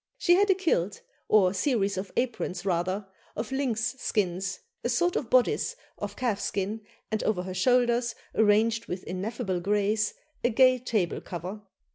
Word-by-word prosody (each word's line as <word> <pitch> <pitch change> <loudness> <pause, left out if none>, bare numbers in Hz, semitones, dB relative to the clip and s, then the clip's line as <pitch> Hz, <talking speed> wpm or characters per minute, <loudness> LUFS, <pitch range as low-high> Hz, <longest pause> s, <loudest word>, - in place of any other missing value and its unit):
She 350 - +4
had 400 +3 +4
a 385 - +6
kilt, 210 - 0 0.2
or 195 -3 +4
series 200 -2 +1
of 190 +1 -4
aprons 235 -7 -2
rather, 185 +2 0 0.3
of 220 +2 -4
lynx 245 -3 0
skins, 195 -3 -1 0.2
a 240 - 0
sort 350 +9 +2
of 235 - -2
bodice 255 - +3 0.2
of 205 0 -5
calf 235 -6 -1
skin, 200 +2 -2 0.3
and 215 - 0
over 185 -5 0
her 185 0 -5
shoulders, 240 +3 +2 0.2
arranged 220 +1 +3
with 180 +1 -4
ineffable 190 +1 -3
grace, 205 +3 +1 0.3
a 240 - +4
gay 255 +1 +5
table 215 -8 -1
cover. 180 +4 -6
215 Hz, 155 wpm, -28 LUFS, 195-245 Hz, 0.3 s, a